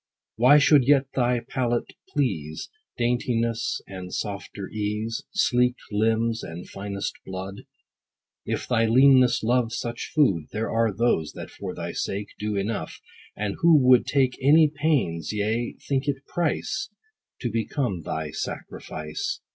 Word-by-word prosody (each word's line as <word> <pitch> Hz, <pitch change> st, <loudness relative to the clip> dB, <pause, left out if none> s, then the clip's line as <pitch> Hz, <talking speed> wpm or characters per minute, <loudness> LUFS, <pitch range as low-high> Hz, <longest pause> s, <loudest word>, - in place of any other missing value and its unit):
What 140 Hz, +5 st, +6 dB
should 140 Hz, -2 st, +5 dB
yet 140 Hz, -1 st, +5 dB
thy 125 Hz, -1 st, +1 dB
palate 120 Hz, -2 st, -2 dB, 0.2 s
please? 80 Hz, -, -2 dB, 0.3 s
Daintiness, 120 Hz, -1 st, 0 dB
and 95 Hz, -1 st, -8 dB
softer 100 Hz, -1 st, -5 dB
ease, 105 Hz, +2 st, -3 dB
Sleeked 125 Hz, -9 st, +2 dB
limbs, 115 Hz, +2 st, +1 dB
and 85 Hz, +2 st, -7 dB
finest 100 Hz, 0 st, -4 dB
blood? 95 Hz, +1 st, -7 dB, 0.8 s
If -, -, -3 dB
thy 115 Hz, -2 st, +2 dB
leanness 130 Hz, 0 st, +5 dB
love 120 Hz, 0 st, +2 dB
such 120 Hz, 0 st, -4 dB
food, 100 Hz, -, +3 dB
There 110 Hz, +2 st, -2 dB
are 115 Hz, -1 st, +2 dB
those, 95 Hz, -7 st, 0 dB
that -, -, -8 dB
for -, -, -6 dB
thy -, -, -4 dB
sake, 100 Hz, +1 st, -3 dB
Do 105 Hz, 0 st, -2 dB
enough; 100 Hz, +2 st, -3 dB, 0.4 s
and 100 Hz, -1 st, -2 dB
who 165 Hz, -2 st, +6 dB
would 125 Hz, -2 st, +5 dB
take 130 Hz, -2 st, +1 dB
Any 150 Hz, +3 st, +6 dB
pains: 130 Hz, -, 0 dB
yea, 110 Hz, +3 st, -1 dB
think 135 Hz, 0 st, 0 dB
it 140 Hz, -1 st, -2 dB
price, 175 Hz, +2 st, -2 dB, 0.5 s
To 120 Hz, -, -2 dB
become 115 Hz, -, -1 dB
thy 80 Hz, -1 st, -4 dB
sacrifice. 400 Hz, 0 st, -5 dB
115 Hz, 135 wpm, -25 LUFS, 105-130 Hz, 0.8 s, What